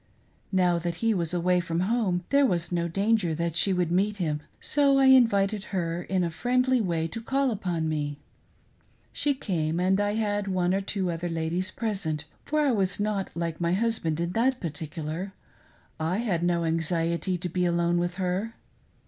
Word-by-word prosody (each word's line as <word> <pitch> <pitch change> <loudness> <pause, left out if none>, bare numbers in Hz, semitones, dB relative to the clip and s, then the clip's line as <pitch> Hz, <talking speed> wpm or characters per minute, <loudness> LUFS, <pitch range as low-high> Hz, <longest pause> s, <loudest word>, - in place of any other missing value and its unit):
Now 180 -3 +3
that 170 0 -3
he 225 - +4
was 170 -5 -1
away 180 +1 +2
from 170 0 -2
home 190 -3 0
there 280 0 +5
was 175 -10 0
no 170 -1 0
danger 195 -1 +1
that 170 0 -2
she 195 +3 +3
would 180 -2 0
meet 200 +4 +1
him, 155 -5 -1 0.2
so 280 -2 +3
I 270 - +5
invited 215 -6 +4
her 170 -3 -2
in 185 0 -1
a 170 - -1
friendly 250 +6 +1
way 165 -5 -1
to 230 - -6
call 270 +2 +1
upon 175 -6 -2
me. 145 -2 -2 1.0
She 285 -1 0
came, 165 - -1
and 190 +2 +2
I 205 0 0
had 205 -2 -1
one 185 -1 +1
or 195 - +1
two 195 -2 -2
other 170 +1 -3
ladies 165 +3 -1
present, 185 -9 -3 0.2
for 305 0 +1
I 290 -3 +3
was 195 -4 0
not 205 -2 -1
like 170 -1 -3
my 170 0 +1
husband 195 -7 0
in 170 +1 -1
that 250 +5 +1
particular 160 +3 -5 0.2
— - - -31
/ - - -35
had 180 +3 0
no 175 -1 +1
anxiety 165 +2 0
to 180 - -4
be 180 +1 0
alone 170 0 +1
with 175 0 -1
her. 190 +5 -2
180 Hz, 185 wpm, -27 LUFS, 170-210 Hz, 1.0 s, there